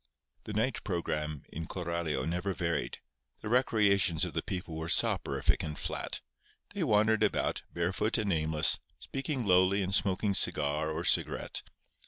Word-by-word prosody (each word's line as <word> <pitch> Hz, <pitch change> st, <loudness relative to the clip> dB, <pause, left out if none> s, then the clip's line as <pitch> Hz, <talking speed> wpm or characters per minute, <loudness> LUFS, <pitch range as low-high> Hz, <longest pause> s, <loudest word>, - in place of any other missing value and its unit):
The 105 Hz, -, -6 dB
night 110 Hz, +4 st, -1 dB
programme 75 Hz, -5 st, -3 dB
in 80 Hz, +1 st, -5 dB
Coralio 85 Hz, -5 st, -3 dB
never 90 Hz, +3 st, -2 dB
varied. 85 Hz, -2 st, -2 dB, 0.4 s
The 105 Hz, -, -5 dB
recreations 100 Hz, -8 st, +3 dB
of -, -, -7 dB
the -, -, -1 dB
people 90 Hz, -3 st, -5 dB
were 80 Hz, +1 st, -5 dB
soporific -, -, +2 dB
and 75 Hz, -2 st, -4 dB
flat. -, -, -3 dB, 0.5 s
They 200 Hz, -3 st, -2 dB
wandered 110 Hz, -4 st, +3 dB
about, 105 Hz, -, +1 dB
barefoot 95 Hz, +7 st, 0 dB
and 105 Hz, -4 st, 0 dB
aimless, 80 Hz, 0 st, +4 dB, 0.2 s
speaking 135 Hz, -2 st, -4 dB
lowly 95 Hz, +1 st, +4 dB
and 95 Hz, +1 st, -3 dB
smoking 100 Hz, +1 st, +1 dB
cigar 75 Hz, -3 st, +1 dB
or 80 Hz, +2 st, -3 dB
cigarette. -, -, +2 dB
90 Hz, 145 wpm, -30 LUFS, 80-105 Hz, 0.5 s, aimless